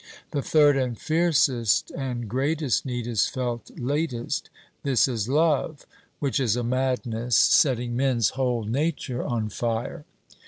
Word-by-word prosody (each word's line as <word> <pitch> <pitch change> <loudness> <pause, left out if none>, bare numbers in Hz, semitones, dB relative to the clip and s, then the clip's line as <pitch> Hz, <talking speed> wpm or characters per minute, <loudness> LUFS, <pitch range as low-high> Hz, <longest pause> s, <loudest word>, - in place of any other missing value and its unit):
The 145 - -1
third 145 -1 +4
and 125 -3 -1
fiercest 145 -9 +2
and 125 -4 -4
greatest 140 +1 0
need 120 -2 -3
is 115 -4 +1
felt 120 -3 -4
latest; 130 -2 -2 0.3
this 135 -3 +3
is 115 -3 -2
love, 150 0 +1 0.3
which 140 -2 -1
is 120 -5 +1
a 125 - -2
madness 125 -2 -1
setting 120 -2 +4
men's 125 -4 +2
whole 125 -3 -1
nature 130 +2 -2
on 110 -3 -2
fire. 115 +6 -3
125 Hz, 130 wpm, -25 LUFS, 120-140 Hz, 0.3 s, third